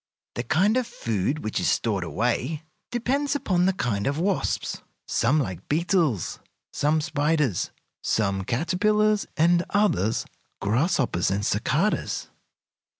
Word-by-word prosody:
The - - -2
kind 185 - +2
of 255 -2 0
food 115 +7 -2
which 110 - -1
is - - +1
stored 105 -5 0
away 125 - -1 0.3
depends 275 +4 0
upon 180 -9 +2
the 190 - +3
kind 105 - -1
of 140 +1 0
wasps. 190 +3 -1 0.3
Some 140 +7 +2
like 95 - -4
beetles, 160 - +1 0.3
some 155 +2 +2
spiders, 150 - 0 0.3
some 100 -3 0
caterpillars, 210 - +1
and 170 +2 +4
others 155 - +1 0.3
grasshoppers 120 - +1
and 100 +2 -1
cicadas. - - 0
150 Hz, 120 wpm, -25 LUFS, 110-185 Hz, 0.3 s, and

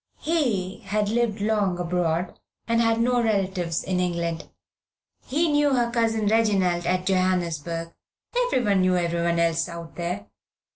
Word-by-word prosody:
He 235 - -1
had 205 +1 -1
lived 225 -2 0
long 205 -4 +1
abroad, 175 0 -1 0.3
had 230 -1 +2
no 245 +1 +2
relatives 190 -6 0
in 185 -1 -1
England. 170 -2 -2 0.8
He 310 +6 +1
knew 290 -2 +3
her 240 -1 +1
Cousin 225 -2 +1
Reginald 195 -5 +2
at 185 +1 0
Johannesburg 170 -3 -1 0.5
everyone 210 - +2
knew 185 0 +3
everyone 170 0 0
else 165 -1 +1
out 170 -1 -9
there. 170 - -3
185 Hz, 130 wpm, -25 LUFS, 170-225 Hz, 0.8 s, knew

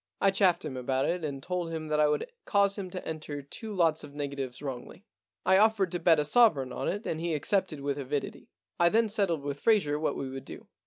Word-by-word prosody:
I 195 - +4
chaffed 185 -4 +2
him 140 -4 -5
about 130 +1 0
it 175 0 -1
and 140 -3 -4
told 180 -2 -3
him 160 -1 -4
that 150 0 +1
I 150 - +5
would 150 - 0 0.2
cause 200 -1 +2
him 195 -3 -5
to 180 0 -7
enter 155 -3 -5
two 215 +10 -8
lots 165 -5 +2
of 140 - -11
negatives 140 -3 -4
wrongly. 140 - -7 0.4
I 190 +1 +5
offered 210 -4 +3
to 175 - -2
bet 165 -2 +5
a 150 - +1
sovereign 150 - +4
on - - -3
it 205 +4 -2
and 160 - -3
he 170 -2 -1
accepted 165 0 0
with 140 0 -2
avidity. 140 +1 -4 0.3
I 170 - +5
then 225 +3 +2
settled 195 -8 0
with 145 0 -4
Fraser 190 -10 +2
what 155 - -1
we 135 - -4
would 135 0 -7
do. - - -10
160 Hz, 230 wpm, -29 LUFS, 145-190 Hz, 0.4 s, I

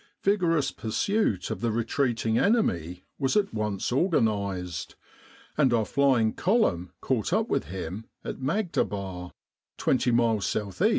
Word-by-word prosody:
Vigorous 175 -7 +2
pursuit 115 - -1
of 95 - -4
the 115 - +1
retreating 115 0 0
enemy 90 - +1
was 135 +6 +1
at 205 - +1
once 105 -2 -2
organised, 100 - 0 0.6
and 135 -4 +4
our 115 -2 +2
flying 130 -5 +2
column 185 - +1
caught 125 -1 -1
up 220 +5 +1
with - - 0
him 95 +3 -6 0.2
at - - -5
Maghdaba, 100 - -2 0.5
twenty 130 -1 +1
miles 115 -3 +2
S.E. 105 - +1
115 Hz, 125 wpm, -27 LUFS, 100-165 Hz, 0.6 s, and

